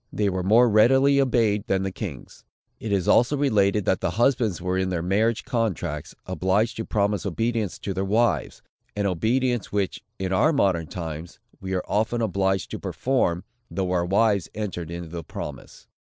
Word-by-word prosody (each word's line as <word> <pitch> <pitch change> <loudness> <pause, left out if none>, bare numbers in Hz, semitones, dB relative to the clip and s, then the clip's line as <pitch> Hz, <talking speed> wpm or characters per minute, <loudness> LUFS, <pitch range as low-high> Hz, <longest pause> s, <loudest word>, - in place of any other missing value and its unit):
They 105 -1 0
were 95 -1 -2
more 110 +7 +5
readily 135 +6 +5
obeyed 115 -6 +1
than 95 0 +1
the 95 - -2
kings. 90 - -8 0.4
It 110 - -5
is 95 -3 +1
also 125 +5 +4
related, 105 -7 +2
that 95 - +1
the - - 0
husbands 120 -6 +2
were 90 +1 -2
in 95 0 0
their 85 -3 -2
marriage 110 +5 +1
contracts, 115 - -2
obliged 95 +5 0
to 110 - -3
promise 105 -1 0
obedience 110 +2 -1
to 100 - -4
their 95 +1 -2
wives; 110 +4 0 0.3
an 100 -1 -1
obedience, 120 +6 0
which, 100 -2 -1 0.2
in 95 0 -2
our 155 - +3
modern 90 - +1
times, 80 -1 -6 0.2
we 95 0 -3
are 90 - -2
often 110 +3 0
obliged 95 -4 0
to - - -4
perform, 110 -10 0 0.3
though 95 -2 -2
our 90 -1 +1
wives 100 -1 +2
entered 95 -6 -4
into 85 -1 -6
the 85 0 -6
promise. - - -8
100 Hz, 175 wpm, -24 LUFS, 95-115 Hz, 0.4 s, more